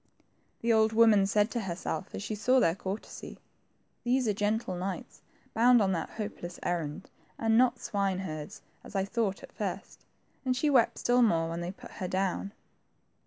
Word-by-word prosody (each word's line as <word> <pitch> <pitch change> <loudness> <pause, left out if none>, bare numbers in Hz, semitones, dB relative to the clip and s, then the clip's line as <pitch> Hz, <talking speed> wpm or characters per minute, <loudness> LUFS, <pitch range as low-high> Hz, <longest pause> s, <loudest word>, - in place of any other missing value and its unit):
The 230 0 +3
old 220 0 +4
woman 220 -3 +6
said 210 +2 +2
to 240 - -1
herself 190 -1 -4
as - - -5
she 210 - -3
saw 250 +5 +3
their 165 -9 +3
courtesy, 195 +3 -6 0.7
These 250 0 +2
are 210 - +2
gentle 210 0 0
knights 185 +1 -5 0.3
bound 240 +2 +6
on 195 -3 +2
that 165 -3 -2
hopeless 175 -5 -5
errand, 170 0 -3 0.3
and 225 0 +2
not 250 +1 +4
swine 200 -3 -1
herds 155 -5 -6 0.2
as - - -12
I 195 0 +1
thought 200 -2 -1
at - - -11
first; - - -5 0.2
'' - - -40
and 255 -2 0
she 295 +3 +2
wept 245 -4 +4
still 245 +1 +3
more 165 -8 +3
when 170 +1 -4
they 175 +1 -3
put 195 - -13
her 185 - -5
down. 190 +1 -1
205 Hz, 180 wpm, -30 LUFS, 185-230 Hz, 0.7 s, woman